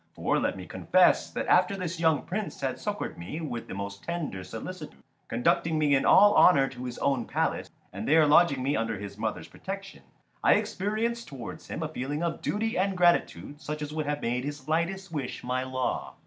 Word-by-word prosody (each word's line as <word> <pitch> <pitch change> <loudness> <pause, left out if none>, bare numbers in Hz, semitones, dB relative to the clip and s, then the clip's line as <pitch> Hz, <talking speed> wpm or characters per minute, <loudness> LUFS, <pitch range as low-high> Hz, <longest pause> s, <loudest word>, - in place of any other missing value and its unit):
For - - +1
let - - -1
me - - -7
confess - - +3
that - - -3
after 200 - +4
this 175 -2 -4
young 160 -3 +2
Prince 210 -3 -4
had 135 -2 -2
succoured 210 - -4
me 90 - -6
with 120 -8 -5
the - - -6
most 100 0 -6
tender 160 - -4
solicitude, 90 - -8 0.2
conducting 155 +7 +1
me 150 -2 +3
in 135 - +3
all 205 +1 +7
honour 140 -6 +6
to 125 -1 -8
his 125 -1 -5
own 135 -4 0
palace - - -1 0.2
and 100 +3 -5
there 155 +1 +6
lodging 145 -3 +4
me 140 +2 +1
under 115 -1 -1
his 100 0 -7
mother's 110 -1 -3
protection, 195 0 -8 0.4
I - - +6
experienced 225 +4 -1
towards 135 -4 -8
him 160 - -4
a - - -1
feeling 145 +1 -4
of 170 -1 -2
duty 225 +2 -1
and 190 0 0
gratitude 145 - +1
such 150 0 -4
as 150 0 -6
would 155 -1 -2
have 145 0 -2
made 125 +2 -1
his 145 -1 -6
lightest 170 +4 -1
wish 145 -5 -4
my 125 +1 -1
law. 130 -1 -3
150 Hz, 200 wpm, -28 LUFS, 125-175 Hz, 0.4 s, all